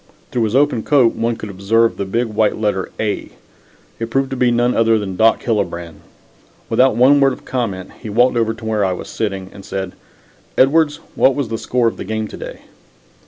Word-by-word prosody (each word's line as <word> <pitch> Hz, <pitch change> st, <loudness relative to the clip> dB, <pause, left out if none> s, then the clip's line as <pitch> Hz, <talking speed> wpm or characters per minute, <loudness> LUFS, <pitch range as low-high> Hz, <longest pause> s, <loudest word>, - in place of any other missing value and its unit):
Through 120 Hz, -2 st, +1 dB
his 110 Hz, +2 st, -2 dB
open 140 Hz, -4 st, +3 dB
coat 130 Hz, -5 st, +3 dB
one 115 Hz, 0 st, -1 dB
could 105 Hz, -2 st, -7 dB
observe 115 Hz, +4 st, +2 dB
the 100 Hz, -, -2 dB
big 115 Hz, +6 st, 0 dB
white 110 Hz, -1 st, 0 dB
letter 105 Hz, -3 st, -1 dB
"A." 105 Hz, -2 st, -2 dB, 0.7 s
It 115 Hz, 0 st, -3 dB
proved 135 Hz, +2 st, 0 dB
to -, -, -2 dB
be 125 Hz, -1 st, +2 dB
none 120 Hz, +1 st, +2 dB
other 115 Hz, 0 st, +4 dB
than 100 Hz, -3 st, -4 dB
Doc 110 Hz, +4 st, +3 dB
Hillebrand. 85 Hz, -7 st, -2 dB, 0.7 s
Without 130 Hz, -3 st, +3 dB
one 130 Hz, +4 st, +5 dB
word 135 Hz, -1 st, +4 dB
of -, -, -12 dB
comment 100 Hz, -8 st, -3 dB
he 110 Hz, -, -6 dB
walked 120 Hz, +4 st, +3 dB
over 115 Hz, -1 st, +1 dB
to 110 Hz, -, -11 dB
where 110 Hz, -2 st, 0 dB
I 95 Hz, -1 st, +1 dB
was -, -, -7 dB
sitting 95 Hz, -4 st, -3 dB
and 100 Hz, -, -11 dB
said: 95 Hz, -1 st, -4 dB, 0.7 s
"Edwards, 150 Hz, +2 st, +3 dB
what 130 Hz, -, +3 dB
was 140 Hz, -6 st, -2 dB
the 115 Hz, -1 st, -3 dB
score 125 Hz, -2 st, +1 dB
of 115 Hz, -, -2 dB
the -, -, -5 dB
game 110 Hz, +2 st, -3 dB
to -, -, -9 dB
day?" -, -, -8 dB
115 Hz, 210 wpm, -18 LUFS, 105-125 Hz, 0.7 s, one